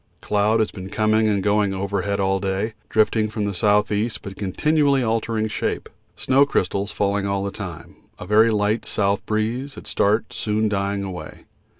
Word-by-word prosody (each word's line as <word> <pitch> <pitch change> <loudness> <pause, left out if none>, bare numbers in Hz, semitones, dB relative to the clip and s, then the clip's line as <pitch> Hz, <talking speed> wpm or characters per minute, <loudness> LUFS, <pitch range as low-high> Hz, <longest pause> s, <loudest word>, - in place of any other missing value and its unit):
Cloud 105 +2 +2
has 110 - 0
been 95 -1 -8
coming 110 +1 +2
and 100 -2 +1
going 105 -1 +2
overhead 100 +1 -2
all 95 0 +1
day, 100 +3 -2 0.2
drifting 110 0 +2
from 105 -1 -2
the 100 - -1
S.E., 105 +3 +2
but 95 -1 -7
continually 140 - +1
altering 110 -1 0
shape. 105 - -3 0.3
Snow 135 +2 +3
crystals 100 -6 -1
falling 100 0 0
all 100 0 -1
the 100 - -3
time; 90 -7 -8 0.2
a - - -8
very 110 +2 +5
light 105 +1 +1
S. 100 -1 +1
breeze 115 +6 -2
at - - -10
start 105 +2 +1
soon 110 0 0
dying 100 -1 -1
away. 95 -2 -8
105 Hz, 170 wpm, -22 LUFS, 100-110 Hz, 0.3 s, very